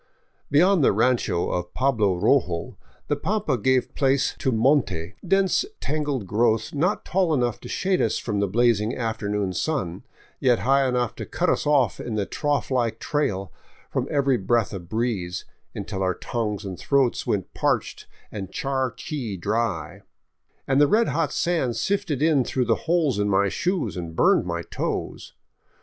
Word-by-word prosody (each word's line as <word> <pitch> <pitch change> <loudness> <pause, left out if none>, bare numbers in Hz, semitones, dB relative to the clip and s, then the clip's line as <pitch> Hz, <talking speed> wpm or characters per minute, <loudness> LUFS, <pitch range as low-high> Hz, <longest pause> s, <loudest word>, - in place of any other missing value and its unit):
" - - -43
Beyond 175 +3 +4
the - - +5
rancho 110 -5 +1
of 90 0 -3
Pablo 110 -8 +2
Rojo 90 -6 +1 0.3
the 145 - +1
pampa 190 -1 -1
gave 130 +2 +1
place 135 -1 +2
to 130 - +1
monte, 110 - +1
dense 195 - +3 0.2
tangled 145 -6 -2
growth 110 +2 +1
not 175 +8 0
tall 180 -4 +1
enough 120 -4 0
to - - -10
shade 190 -1 0
us 110 - +1
from 100 - -2
the 100 - +1
blazing 115 +1 +2
afternoon 105 -4 -2
sun, 90 - -2 0.4
yet 125 -3 +3
high 135 +5 +2
enough 125 -2 0
to - - -5
cut - - 0
us - - -1
off 135 -8 +2
in 115 - -4
the 105 -2 0
trough 145 +3 -1
like 120 -3 +1
trail 100 -10 -2 0.4
from - - -1
every 140 -3 +2
breath 115 +2 +1
of 85 -3 -7
breeze, 105 -6 -2 0.3
until 100 -1 -4
our 95 -1 +1
tongues 105 -3 -3
and 95 -2 -6
throats 135 -4 +1
went - - -1
parched - - -1 0.2
and 100 -3 -6
charqui 130 - -3
dry, 100 -6 -2 0.7
and 135 +1 +3
the 145 - +6
red 225 +8 +3
hot 165 -2 0
sand 160 -9 0
sifted 195 -8 -1
in 155 -5 +4
through 125 +1 -1
the - - +3 0.2
holes 160 - +2
in 105 0 +1
my 100 0 +3
shoes 175 - -1
and 85 -2 -6
burned - - +3
my - - -2
toes. - - -4
120 Hz, 165 wpm, -24 LUFS, 100-145 Hz, 0.7 s, the